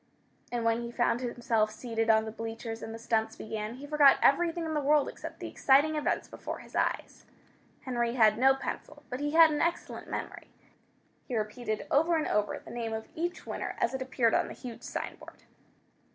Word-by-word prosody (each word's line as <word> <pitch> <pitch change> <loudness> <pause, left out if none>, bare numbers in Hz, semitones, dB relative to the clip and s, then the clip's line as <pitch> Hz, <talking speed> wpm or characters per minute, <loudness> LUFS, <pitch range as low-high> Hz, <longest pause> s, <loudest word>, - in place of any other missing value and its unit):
And 240 -1 -2
when 230 +1 +2
he 235 - -5
found 240 0 +1
himself 235 -3 0
seated 225 0 -3
on 220 0 +5
the 220 - -5
bleachers 225 0 -6
and 225 - -6
the 225 - -6
stunts 225 -1 0
began, 220 +1 -5
he 275 +3 -9
forgot 290 -2 +6
everything 335 +3 +3
in 320 - -3
the 300 - 0
world 290 0 +3
except - - -8
the - - -5
exciting 285 +3 +3
events 300 - -1
before - - -6
his - - -13
eyes. - - -1 0.6
Henry 240 -3 -1
had 220 -3 +5
no 265 +1 +6
pencil, 270 - -6
but 250 - -3
he 290 +1 -2
had 325 -1 +8
an 295 - 0
excellent 340 +1 -2
memory. - - -5 0.8
He 250 - -3
repeated 215 +1 -3
over 325 +4 +4
and 310 - 0
over, 210 0 0
the - - -12
name 230 -2 -3
of 220 0 -5
each 345 +2 -3
winner - - -4
as 235 - 0
it 265 - -3
appeared 255 -3 +1
on - - +2
the - - -8
huge 240 -3 -9
signboard. - - -7
240 Hz, 195 wpm, -30 LUFS, 225-290 Hz, 0.8 s, had